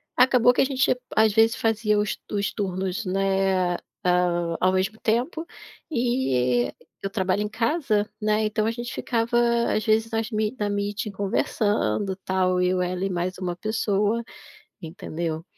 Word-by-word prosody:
acabou 250 -1 +5
que - - +2
a - - +4
gente 260 -2 +2 0.2
às 220 -1 +4
vezes 225 +1 +4
fazia 215 -2 +1
os 210 - -1
os 200 -1 -1
turnos, 190 0 -2
né, 190 -1 +1
a - - -3 0.8
ao 185 - +4
mesmo 190 +4 0
tempo 255 +9 0 0.5
e 130 - +1 0.3
eu 195 - -1
trabalho 190 -1 0
em 210 - -2
casa, 230 -2 0
né, 215 0 +2
então 215 0 0
a 225 - +1
gente 240 +1 -6
ficava 235 0 0 0.4
às 215 - 0
vezes 220 0 +2
nas 225 +1 -2
me 215 +2 -1
na 205 -1 -1
meeting 205 0 -2
conversando 200 - 0
tal, 185 -1 +1
eu 180 0 +2
e - - +1
ela 185 +1 -3
e 195 - 0
mais 180 +1 -2
uma 180 -2 -3
pessoa, 215 +2 0 0.6
entendeu? 165 -1 -5
205 Hz, 160 wpm, -25 LUFS, 185-225 Hz, 0.8 s, acabou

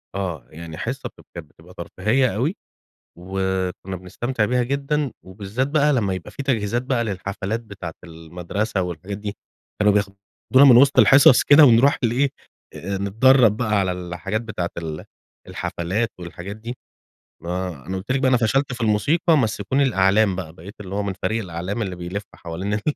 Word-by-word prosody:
آه، 90 -8 -4
يعني 80 0 -9
حصة - - -4
بتب - - -20
كانت 80 -4 -8
بتبقى 85 +4 -18
ترفيهية 105 +7 0
أوي، 140 - 0 0.6
وكنا 95 0 -3
بنستمتع 105 +6 -2
بيها 125 +2 +1
جدًا 140 +1 -1
وبالذات 100 +7 -3
بقى 150 0 +2
لما 105 -6 0
يبقى 95 -2 -7
في 140 - -6
تجهيزات 120 -3 0
بقى 125 -3 0
للحفلات 100 +2 -3
بتاعة 95 -7 -8
المدرسة 90 +5 -4
والحاجات 90 +3 -5
دي، 105 -1 -6 0.4
كانوا 105 -1 +4
بياخدونا 100 +7 +1
من - - +8
وسط 140 0 +5
الحصص 130 +2 +7
كده 145 +2 +7
ونروح 125 +3 +5
لإيه 125 +4 +2 0.4
آآ 100 +2 -4
نتدرب 110 +3 +4
بقى 110 -3 0
على 95 -1 0
الحاجات 90 +4 -4
بتاعة 105 -7 -4
ال 80 -2 -5 0.4
الحفلات 100 +7 -2
والحاجات 90 +3 -8
دي، 115 +3 -7 0.7
ما 90 -5 -4
أنا 95 +1 -4
قلت 100 +7 -5
لِك 135 - +1
بقى 130 - +2
أنا 125 - +4
فشلت 125 +4 +1
في 125 - -7
الموسيقى 145 - +2
مَسِّكوني 115 +3 0
الأعلام 100 -3 +3
بقى، 90 -4 -6
بقيت 95 +4 -12
اللي 95 0 -7
هو 105 - -1
من 100 -1 -2
فريق 110 0 0
الأعلام 90 +5 -4
اللي 95 -3 -3
بيلف 90 +4 -5
حوالين 90 +5 -5
ال 105 - -1
100 Hz, 165 wpm, -22 LUFS, 90-120 Hz, 0.7 s, من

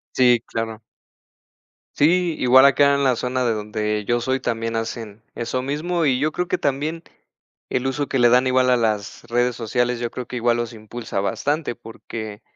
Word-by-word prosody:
Sí, 125 -2 +4
claro. 115 -1 -4 1.2
Sí, 170 +2 +3
igual 130 +2 +6
acá 140 +1 +5
en 140 0 +1
la 130 -2 +3
zona 125 +2 -1
de 120 -2 +1
donde 105 0 -2
yo 120 +1 +1
soy 130 +2 0
también 115 -1 -2
hacen 115 -1 -5
eso 125 +2 -3
mismo, 160 +5 -1
y 130 -3 +2
yo 155 +3 +1
creo 180 +3 -2
que - - -1
también, 150 +4 -1 0.7
el 130 +1 -1
uso 140 +2 -2
que 135 - -1
le 120 0 +6
dan 125 +2 +4
igual 130 0 +3
a 125 - +4
las 110 -3 -2
redes 120 +1 0
sociales, 120 +1 -1
yo 120 -1 -3
creo 125 - -6
que - - -7
igual 120 0 +2
los 120 0 -3
impulsa 110 -1 -6
bastante, 130 +8 -1
porque, 110 -2 -8
125 Hz, 185 wpm, -22 LUFS, 115-135 Hz, 1.2 s, igual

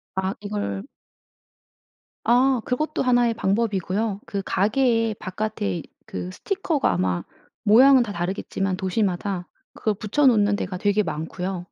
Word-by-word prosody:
아 190 0 -1
이걸 205 - -3 1.4
아 250 +2 +3
그것도 305 +5 -1
하나의 245 -2 +3
방법이고요. 205 -1 0
그 200 - -2
가게에 225 +1 +2
바깥에 185 - -3 0.2
그 90 0 -5
스티커가 360 - -1
아마 90 0 0 0.4
모양은 255 +4 +7
다 210 - -5
다르겠지만 190 +1 -2
도시마다 190 -1 -1 0.3
그걸 215 -2 -1
붙여 215 +8 +2
놓는 205 -4 +4
데가 185 -2 -4
되게 205 +2 +2
많고요. 180 +3 -4
205 Hz, 280 characters per minute, -24 LUFS, 185-235 Hz, 1.4 s, 모양은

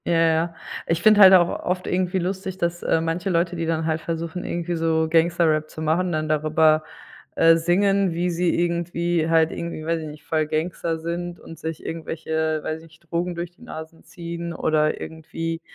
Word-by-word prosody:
Ja, 175 - +1
ja. 165 0 +2 0.3
Ich 165 +1 0
finde 215 -1 +6
halt 190 -1 +10
auch 175 -2 +7 0.2
oft 180 0 -1
irgendwie 185 +1 0
lustig, 190 +1 -3
dass, 170 -1 -1
äh, 160 - +1
manche 165 +4 -2
Leute, 175 0 +1
die 165 -1 -2
dann 160 -1 0
halt 160 0 -1
versuchen, 165 +2 -4
irgendwie 175 0 -3
so 160 -1 +1
Gangster-Rap 160 -1 +2
zu - - -10
machen, 175 +4 +1
dann 155 -1 -1
darüber, 155 +1 +3 0.5
äh, 165 0 +6
singen, 195 +3 +2
wie 175 +2 -1
sie 170 0 +1
irgendwie 170 -1 0
halt 160 -1 +4
irgendwie, 170 -2 -5
weiß 165 0 0
ich 155 - -6
nicht, 150 0 -11
voll 155 -2 0
Gangster 165 +1 -2
sind 170 +2 -4
und 165 - -12
sich 160 -1 -6
irgendwelche, 160 -1 -2
weiß 155 0 -4
ich 165 - -15
nicht, 165 +1 -24
Drogen 175 +1 -1
durch 170 0 -5
die 175 - -28
Nasen 160 -8 -9
ziehen 170 0 -6
oder 155 -2 +1
irgendwie, 165 +1 -5
165 Hz, 190 wpm, -23 LUFS, 160-175 Hz, 0.5 s, halt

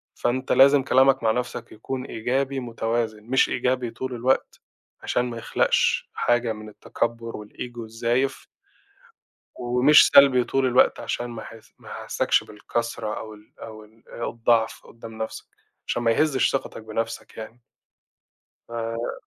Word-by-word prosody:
فأنت 130 +2 -1
لازم 135 0 +6
كلامك 130 -1 +4
مع 110 - +3
نَفْسك 125 -1 -4
يكون 130 +4 -5
إيجابي 135 +4 -2
متوازن، 115 -2 -3
مش 130 +3 +2
إيجابي 125 -1 -1
طول 130 -1 -5
الوقت، 125 +3 0 0.4
عشان 125 - 0
ما 115 - -6
يخلقش - - +1
حاجة 120 -1 +1
من 110 0 -10
التكبُّر 115 +2 -3
والego 120 +3 -8
الزايف. 115 +4 -2 1.1
ومش 125 +4 +5
سلبي 135 -3 +7
طول 135 +1 0
الوقت 125 0 +3
عشان 120 - -3
ما 115 -1 -7
ح - - -11 0.3
ما - - -13
أحسكش - - 0
بالكسرة 110 0 -4
أو 110 -1 -8
ال 105 0 -18
أو 110 -1 -10
ال 110 +2 -23
أو 120 - -4
الضعف 115 -1 +1
قدّام 115 -1 -12
نَفْسك، - - -8 0.4
عشان 120 - -1
ما 115 - +3
يهزش 145 +1 +2
ثقتك 135 -4 -4
بنَفْسك 115 +2 -5
يعني. 115 +2 -9 1.1
ف 115 0 -4
120 Hz, 140 wpm, -24 LUFS, 115-130 Hz, 1.1 s, سلبي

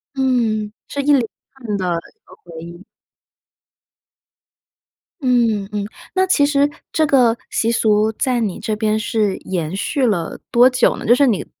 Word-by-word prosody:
嗯， 230 -5 0 0.2
是 285 - -3
一 - - -7
连 270 - +4 0.3
串 230 -6 -4
的 185 - -3 0.3
这 - - -49
个 - - -16
回 165 -2 -10
忆。 170 +3 -11 2.4
嗯， 235 -7 +1
嗯， 205 -1 -3 0.3
那 375 - +3
其 290 -6 +3
实 285 0 +2 0.2
这 315 - +2
个 245 -5 +3
习 230 +1 0
俗 215 -1 +2
在 250 +2 -1
你 205 -5 -2
这 215 - -2
边 215 0 0
是 215 -2 -1
延 175 -2 -4
续 260 +7 -1
了 175 -7 -1
多 245 +2 +6
久 255 -1 +2
呢？ - - -8
就 235 - +5
是 275 +2 +4
你 215 -6 0
225 Hz, 170 characters per minute, -19 LUFS, 205-260 Hz, 2.4 s, 多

